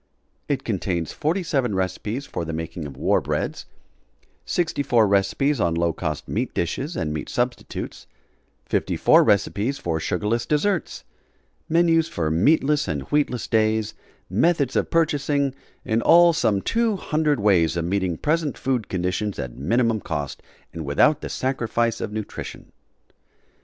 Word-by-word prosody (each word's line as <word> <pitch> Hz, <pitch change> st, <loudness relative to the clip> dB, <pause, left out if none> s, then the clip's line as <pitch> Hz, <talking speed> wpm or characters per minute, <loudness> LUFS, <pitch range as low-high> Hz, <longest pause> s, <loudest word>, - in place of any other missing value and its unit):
It 135 Hz, -2 st, -1 dB
contains 90 Hz, -6 st, -2 dB
47 150 Hz, -, 0 dB
recipes 100 Hz, +8 st, -2 dB
for -, -, -4 dB
the 80 Hz, 0 st, -5 dB
making 80 Hz, 0 st, -5 dB
of 70 Hz, -2 st, -11 dB
war -, -, +2 dB
breads; -, -, -3 dB, 0.8 s
64 140 Hz, -9 st, +1 dB
recipes 100 Hz, +8 st, +1 dB
on 85 Hz, -3 st, +1 dB
low 85 Hz, 0 st, +1 dB
cost 75 Hz, -3 st, -4 dB
meat -, -, -2 dB
dishes 135 Hz, -, -2 dB
and 75 Hz, -1 st, -2 dB
meat 75 Hz, -, -5 dB
substitutes; 120 Hz, 0 st, -3 dB, 0.6 s
54 -, -, +3 dB
recipes 105 Hz, +5 st, +1 dB
for 80 Hz, -7 st, -2 dB
sugarless 105 Hz, +8 st, -1 dB
desserts; 170 Hz, +5 st, 0 dB, 0.7 s
menus 165 Hz, 0 st, +3 dB
for 80 Hz, -2 st, -2 dB
meatless 145 Hz, -, +3 dB
and 75 Hz, -5 st, -2 dB
wheatless 145 Hz, -5 st, +1 dB
days, 110 Hz, -1 st, +1 dB, 0.3 s
methods 140 Hz, -, +1 dB
of -, -, +1 dB
purchasing 145 Hz, -4 st, +1 dB, 0.3 s
in 115 Hz, -1 st, +1 dB
all 170 Hz, +3 st, +6 dB
some 100 Hz, -10 st, +1 dB
two 230 Hz, -2 st, +1 dB
hundred 150 Hz, -6 st, 0 dB
ways 90 Hz, -5 st, +3 dB
of 85 Hz, -, -1 dB
meeting 95 Hz, -2 st, -1 dB
present 155 Hz, -2 st, 0 dB
food 125 Hz, -6 st, -1 dB
conditions 95 Hz, +3 st, -2 dB
at 60 Hz, -1 st, -5 dB
minimum 115 Hz, -, +1 dB
cost 75 Hz, -6 st, -4 dB, 0.3 s
and 80 Hz, -, -5 dB
without 145 Hz, -, +3 dB
the -, -, -5 dB
sacrifice 120 Hz, -3 st, -1 dB
of 105 Hz, -, -3 dB
nutrition. 110 Hz, -1 st, -7 dB
110 Hz, 135 wpm, -23 LUFS, 90-145 Hz, 0.8 s, all